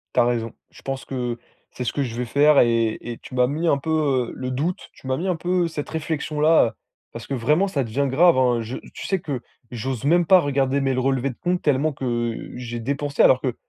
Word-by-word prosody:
Tu -, -, +5 dB
as -, -, +3 dB
raison. 115 Hz, -2 st, -1 dB, 0.2 s
Je -, -, -16 dB
pense 135 Hz, -1 st, -4 dB
que 125 Hz, -3 st, -3 dB, 0.3 s
c'est 125 Hz, -, -5 dB
ce -, -, 0 dB
que 145 Hz, -, -1 dB
je 120 Hz, -3 st, -5 dB
vais 125 Hz, -, -2 dB
faire 145 Hz, +4 st, +4 dB
et 115 Hz, -2 st, +2 dB
et 120 Hz, -1 st, -6 dB
tu 130 Hz, -, -10 dB
m'as 125 Hz, 0 st, +3 dB
mis 155 Hz, +5 st, -2 dB
un 145 Hz, -, +3 dB
peu, 140 Hz, +4 st, -6 dB, 0.4 s
heu, -, -, -10 dB
le 130 Hz, 0 st, -4 dB
doute. 155 Hz, +8 st, -2 dB
Tu 130 Hz, -, -13 dB
m'as 130 Hz, -, 0 dB
mis 180 Hz, -, -3 dB
un 180 Hz, -, +1 dB
peu 175 Hz, +1 st, 0 dB
cette 150 Hz, -3 st, -5 dB
réflexion-là, 155 Hz, 0 st, +2 dB
heu, 115 Hz, -, -5 dB, 0.4 s
parce 115 Hz, -1 st, -9 dB
que 140 Hz, -, -4 dB
vraiment 150 Hz, +11 st, +2 dB
ça 140 Hz, -8 st, -1 dB
devient 135 Hz, +5 st, -1 dB
grave 165 Hz, +2 st, +5 dB
hein. 125 Hz, -2 st, +2 dB
Je 115 Hz, +3 st, -5 dB, 0.2 s
tu -, -, -7 dB
sais 190 Hz, -2 st, 0 dB
que 140 Hz, -7 st, -4 dB, 0.3 s
j'ose 125 Hz, +1 st, -4 dB
même 175 Hz, +3 st, +4 dB
pas 185 Hz, +3 st, +7 dB
regarder, 140 Hz, -1 st, +1 dB
mes 135 Hz, -1 st, +1 dB
le 130 Hz, -, 0 dB
relevés 135 Hz, 0 st, 0 dB
de -, -, -15 dB
compte, 180 Hz, 0 st, 0 dB
tellement 145 Hz, +1 st, +2 dB
que 120 Hz, -3 st, -3 dB
j'ai 120 Hz, -1 st, -5 dB
dépensé 140 Hz, +4 st, 0 dB
alors 130 Hz, -1 st, +5 dB
que, 125 Hz, -3 st, -2 dB
135 Hz, 245 wpm, -23 LUFS, 120-150 Hz, 0.4 s, pas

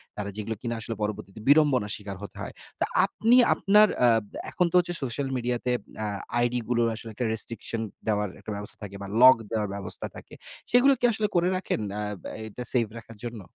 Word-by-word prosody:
তারা 100 Hz, -1 st, -4 dB
যেগুলো 110 Hz, +1 st, -4 dB
কিনা 120 Hz, -1 st, -2 dB
আসলে 115 Hz, 0 st, -4 dB
পরবর্তীতে 105 Hz, -1 st, -4 dB
বিড়ম্বনা 145 Hz, -7 st, +5 dB
স্বীকার 100 Hz, -2 st, -7 dB
হতে 100 Hz, -, -9 dB
হয়। -, -, -6 dB, 0.3 s
তো -, -, +2 dB, 0.2 s
আপনি 230 Hz, +3 st, +2 dB, 0.2 s
আপনার 210 Hz, +2 st, +5 dB
অ্যাব 115 Hz, -3 st, +4 dB, 0.3 s
এখন 180 Hz, -, +2 dB
তো -, -, -2 dB
হচ্ছে 175 Hz, 0 st, -1 dB
সোশ্যাল 135 Hz, +2 st, -2 dB
মিডিয়াতে 125 Hz, 0 st, -1 dB, 0.3 s
অ্যা 110 Hz, -, -1 dB, 0.3 s
আইডিগুলো্র 120 Hz, -1 st, +1 dB
আসলে 115 Hz, 0 st, -7 dB
একটা 120 Hz, +3 st, -2 dB
restriction 115 Hz, 0 st, -2 dB, 0.3 s
দেওয়ার 105 Hz, -2 st, +1 dB
একটা 110 Hz, -, -7 dB
ব্যবস্থা 105 Hz, 0 st, -3 dB
থাকে 100 Hz, -1 st, -7 dB
বা, 100 Hz, -, -5 dB
lock 130 Hz, -1 st, +9 dB
দেওয়ার 105 Hz, -2 st, -1 dB
ব্যবস্থা 100 Hz, -, -3 dB
থাকে। -, -, -12 dB, 0.4 s
সেগুলো 260 Hz, +3 st, +6 dB
কি 245 Hz, -, +2 dB
আসলে 215 Hz, -1 st, 0 dB
করে 175 Hz, +1 st, +3 dB
রাখেন 185 Hz, -, -2 dB
অ্যা 105 Hz, -, -3 dB, 0.2 s
ব্যা -, -, -7 dB, 0.2 s
এটা 125 Hz, +4 st, -7 dB
সেফ 120 Hz, -3 st, +2 dB
রাখার 115 Hz, -1 st, -11 dB
জন্য? 115 Hz, -3 st, -5 dB
115 Hz, 190 wpm, -27 LUFS, 105-135 Hz, 0.4 s, lock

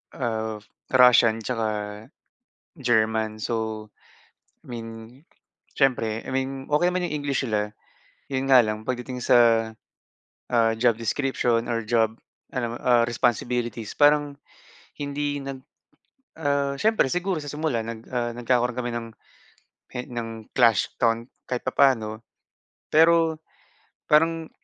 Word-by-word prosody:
ah 110 Hz, -3 st, -2 dB, 0.4 s
Russian 115 Hz, -3 st, +6 dB
'tsaka 110 Hz, -2 st, -3 dB, 0.7 s
German 110 Hz, -3 st, +1 dB
so, 110 Hz, -2 st, -3 dB, 0.8 s
I -, -, -20 dB
mean 115 Hz, -1 st, -6 dB, 0.9 s
siyempre, 115 Hz, -5 st, +1 dB
I 130 Hz, -, -6 dB
mean 135 Hz, 0 st, -2 dB
okey 175 Hz, +4 st, +4 dB
naman 180 Hz, 0 st, -1 dB
yung 150 Hz, -3 st, -2 dB
English 140 Hz, -1 st, -1 dB
nila 105 Hz, -2 st, -2 dB, 0.5 s
yun 135 Hz, 0 st, -2 dB
nga 130 Hz, -, +9 dB
lang 110 Hz, 0 st, -3 dB
pagdating 125 Hz, +1 st, -4 dB
sa, 115 Hz, -3 st, +4 dB, 0.8 s
ah, 115 Hz, -2 st, +3 dB
job 120 Hz, -1 st, +4 dB
description 120 Hz, -1 st, 0 dB
or 115 Hz, -1 st, -1 dB
job 110 Hz, 0 st, +1 dB, 0.4 s
ano, 120 Hz, -2 st, -2 dB
ah, 120 Hz, -1 st, +3 dB
responsibilities 120 Hz, -1 st, -1 dB
parang 145 Hz, -1 st, +3 dB, 0.6 s
hindi 145 Hz, 0 st, -2 dB
nag 135 Hz, -1 st, -7 dB, 0.8 s
ah, 140 Hz, -2 st, 0 dB
siyempre 215 Hz, -7 st, +2 dB
siguro 180 Hz, -1 st, -1 dB
sa 145 Hz, -, -7 dB
simula 150 Hz, -6 st, -1 dB
nag, 115 Hz, 0 st, -7 dB
ah, 120 Hz, -1 st, 0 dB
nagkakaroon 120 Hz, 0 st, +1 dB
kami 120 Hz, -1 st, -2 dB
ng 115 Hz, -1 st, -4 dB, 0.8 s
e 125 Hz, -, -6 dB
ng 115 Hz, -2 st, -6 dB
clash 115 Hz, -5 st, +3 dB
on 115 Hz, -1 st, +2 dB, 0.2 s
kahit 125 Hz, -1 st, -3 dB
papaano 115 Hz, -5 st, +2 dB, 0.7 s
pero 165 Hz, 0 st, +4 dB, 0.7 s
parang 165 Hz, +1 st, +3 dB
120 Hz, 120 wpm, -25 LUFS, 115-140 Hz, 0.9 s, nga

